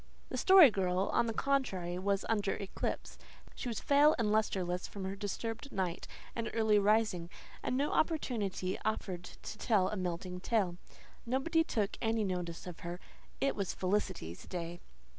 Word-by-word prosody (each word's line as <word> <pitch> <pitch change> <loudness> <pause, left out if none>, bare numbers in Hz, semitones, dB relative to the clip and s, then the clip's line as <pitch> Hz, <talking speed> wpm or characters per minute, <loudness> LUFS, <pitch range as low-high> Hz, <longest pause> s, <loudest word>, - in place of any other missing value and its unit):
The - - -3
Story 375 - +9
Girl, 185 -1 0
on 235 - +3
the - - 0
contrary, 200 -10 0
was 200 +1 0
under 210 -3 +1
eclipse. 195 - -4 0.3
She 245 - -5
was 225 - -3
pale 290 +2 +5
and 215 -3 +1
lustreless 185 -4 0
from 200 - -7
her 190 +1 -3
disturbed 225 +6 -4
night 185 -3 -2 0.3
and 230 -1 -2
early 220 -2 +4
rising; 205 -4 +2 0.3
and 255 - -1
no 285 +2 +1
opportunity 215 - 0
offered 190 -5 -2
to 215 - -9
tell 200 -6 +3
a - - -3
melting 180 -1 -3
tale. 190 -3 0 0.5
Nobody 270 +7 +2
took 215 -9 -1
any 225 -1 +1
notice 180 -3 -3
of 180 -2 -8
her. 175 +1 -5 0.4
It 275 - +1
was 195 -3 -2
Felicity's 185 - -2
day. 175 -1 -5
200 Hz, 160 wpm, -33 LUFS, 180-230 Hz, 0.5 s, Story